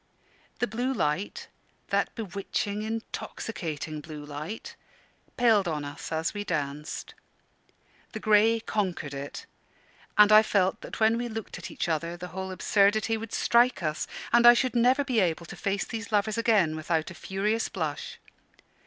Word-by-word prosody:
The - - +1
blue 245 +3 -2
light 150 +1 -1 0.4
that - - 0
bewitching, 205 0 -3
intoxicating 175 -8 -5
blue 150 -1 -8
light 150 +9 -7 0.6
paled 225 -6 +4
on 150 -3 -2
us 145 0 -7
as 160 0 -1
we 205 -1 -3
danced. 150 -4 -4 1.0
The 220 - -4
grey 215 +2 +4
conquered 185 -10 -2
it, 140 +1 -6 0.7
and 210 0 +8
I 215 0 +10
felt 195 -3 +1
that - - -8
when 225 +1 +4
we 240 - -2
looked 225 -1 -6
at - - -7
each - - -3
other 170 +1 -1
the 180 +1 -7
whole 190 +2 -5
absurdity 205 +3 +2
would 225 0 -6
strike 235 -5 +3
us, 155 0 -1 0.3
and 240 0 +7
I 240 - +10
should 255 +1 0
never 250 +4 +4
be 255 -5 +1
able 170 -3 +1
to - - -9
face 200 0 -1
these 225 0 -6
lovers 210 +1 +2
again 215 -9 +3
without 160 +1 -1
a - - -8
furious 205 +5 -1
blush. 155 -5 -4
200 Hz, 155 wpm, -28 LUFS, 160-225 Hz, 1.0 s, I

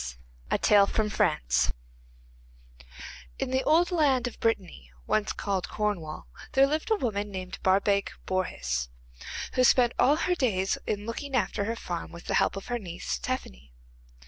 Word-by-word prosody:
The - - +2
Four 210 +1 +4 0.2
Gifts - - +1 1.7
In - - -2
the 260 0 +1
old 340 +4 +4
land 280 -7 +3
of 245 - -5
Brittany, 185 - -1 0.2
once 215 -1 +1
called 195 -3 -2
Cornwall, 200 -8 -3 0.3
there 270 +1 +6
lived 310 +8 -1
a 440 - +4
woman 210 - -2
named 185 -2 -6
Barbaik 200 +1 +2 0.2
Bourhis, 60 - -1 0.6
who 255 - +3
spent 245 -1 +5
all 275 +4 +5
her 360 +3 +1
days 200 - 0
in 205 0 -2
looking 265 +4 -4
after 210 -4 0
her 225 +2 -2
farm 175 -6 -5
with 170 - -11
the - - -2
help - - +2
of 195 - -6
her 245 -1 -2
niece 175 - -4
Tephany. 60 0 -5
205 Hz, 150 wpm, -28 LUFS, 185-255 Hz, 1.7 s, there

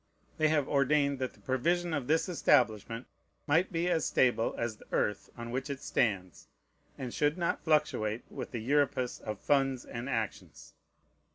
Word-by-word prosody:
They 155 - +4
have 150 -3 +2
ordained 140 0 +2
that 130 -1 -2
the - - -22
provision 170 +6 0
of 140 -5 -2
this 160 +4 +2
establishment 115 - +2 0.4
might 165 +6 +2
be 170 0 0
as 170 -2 +2
stable 120 -3 +2
as 115 -2 -2
the - - -17
earth 105 - 0
on 120 0 -6
which 130 +3 -3
it 140 -2 -4
stands, 95 - -1 0.5
and 125 -2 -5
should 150 +3 +1
not 170 -1 -1
fluctuate 125 -8 +1
with - - -6
the 120 - -4
Euripus 140 -1 +1
of 105 -2 -5
funds 135 -3 +1
and 120 +3 -6
actions. 115 -4 -4
135 Hz, 165 wpm, -31 LUFS, 120-150 Hz, 0.5 s, They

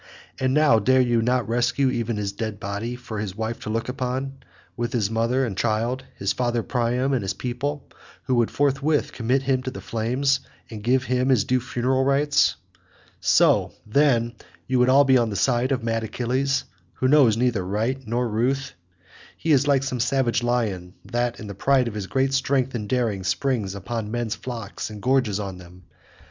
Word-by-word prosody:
And 130 0 +1
now 150 -7 +5
dare 130 +5 +3
you 120 -2 +3
not 125 +1 +1
rescue 120 +3 +1
even 115 -3 -2
his 100 -1 -2
dead 105 0 -5
body, 100 +5 -4
for 120 -4 -7
his 100 -3 -4
wife 110 +1 -3
to - - -7
look 115 +1 -2
upon, 130 +1 -3 0.4
with 120 0 -3
his 110 -4 0
mother 115 +4 +1
and 105 -6 -4
child, 115 +5 -1
his 100 - 0
father 120 -2 -1
Priam, 125 +2 0
and 130 - +1
his 95 -1 -3
people, 130 +6 -4 0.4
who 130 - -1
would 120 -2 +2
forthwith 145 +2 +1
commit 130 +3 0
him 130 -1 +1
to 130 - -4
the 130 - -8
flames, 130 +5 0 0.3
and 110 -2 -7
give 125 +4 +2
him 125 +1 0
his 125 -6 +4
due 130 +2 +1
funeral 130 +2 0
rites? 140 +2 +3 0.6
So, - - +3
then, 120 -1 +2 0.3
you 130 -1 +1
would 125 +1 +4
all 140 +2 +6
be 130 -2 +4
on 115 -2 +1
the 100 - -4
side 120 +6 +1
of 130 -3 0
mad 115 -1 -1
Achilles, 130 +4 -1 0.3
who 130 - 0
knows 130 -6 +5
neither 120 -5 +1
right 110 +8 -1
nor 120 +2 0
ruth? 125 +5 -1 0.6
He 165 - -1
is 140 -1 +4
like 140 -2 +3
some 130 -2 -3
savage 120 -1 +1
lion 105 -7 -1
that 120 0 -2
in - - -7
the 100 - -6
pride 130 +5 +2
of 115 - -4
his 105 -3 -4
great 135 +3 0
strength 135 -1 +1
and 105 -4 -4
daring 115 -7 0
springs 100 0 -1
upon 105 +2 -4
men's 120 -1 -2
flocks 115 -3 -6
and 105 -1 -8
gorges 125 -3 +1
on 95 -3 -5
them. 90 +1 -14
120 Hz, 190 wpm, -24 LUFS, 110-130 Hz, 0.6 s, all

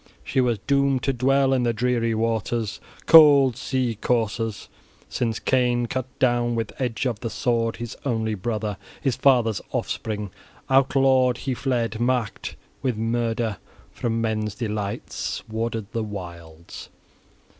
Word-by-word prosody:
She 130 - +1
was 120 -3 +1
doomed 140 -1 +2
to 135 - +1
dwell 135 +2 +2
in 130 - +2
the 120 -1 +1
dreary 115 -1 0
waters, 115 -1 -1 0.3
cold 145 -6 +8
sea 125 -3 -2
courses, 115 -2 -1 0.4
since 115 -2 -1
Cain 125 -2 +1
cut 130 +2 -3
down 120 -2 +2
with 115 -2 -2
edge 120 -1 -1
of 120 -5 -1
the 115 - -4
sword 115 +1 0
his 120 0 -6
only 110 -5 -1
brother, 105 0 -3 0.2
his 135 -5 0
father's 120 -7 +3
offspring: 105 -3 -3 0.4
outlawed 130 -2 +4
he 135 - 0
fled, 120 -4 -1
marked 120 -3 -1 0.3
with 125 -4 -1
murder, 115 -1 -1 0.3
from 115 -1 -2
men's 110 -2 -1
delights 105 -3 -4
warded 115 0 -3
the 115 - -2
wilds. 85 -5 -8
115 Hz, 135 wpm, -24 LUFS, 110-125 Hz, 0.4 s, cold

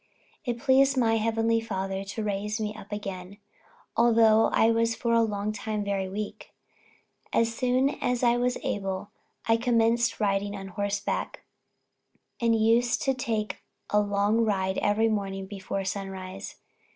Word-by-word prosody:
It 240 -2 -1
pleased 270 +2 +4
my 225 -2 +3
Heavenly 225 +1 +1
Father 195 -3 -3
to 200 +3 -5
raise 210 +1 -2
me 210 -1 -2
up 215 -1 -12
again, 195 -2 -6 0.6
although 225 -1 +5
I 225 - +3
was 230 0 +1
for 235 -1 -1
a 230 - +5
long 210 -1 -1
time 215 -1 -3
very 195 -2 -2
weak. 210 +2 -6 0.8
As 230 0 +2
soon 255 +3 +2
as 245 0 0
I 240 -1 +4
was 245 +1 0
able, 195 0 -3 0.4
I 225 0 +4
commenced 235 0 +2
riding 200 -1 0
on 195 -1 -7
horseback, 200 +2 -3 1.0
and 230 -1 +3
used 230 +2 +2
to 270 - +2
take 220 -7 -3 0.3
a 210 - +4
long 205 +2 +2
ride 190 -3 0
every 215 +2 +2
morning 195 -3 -2
before 195 0 -4
sunrise. 190 0 -5
215 Hz, 145 wpm, -27 LUFS, 200-230 Hz, 1.0 s, although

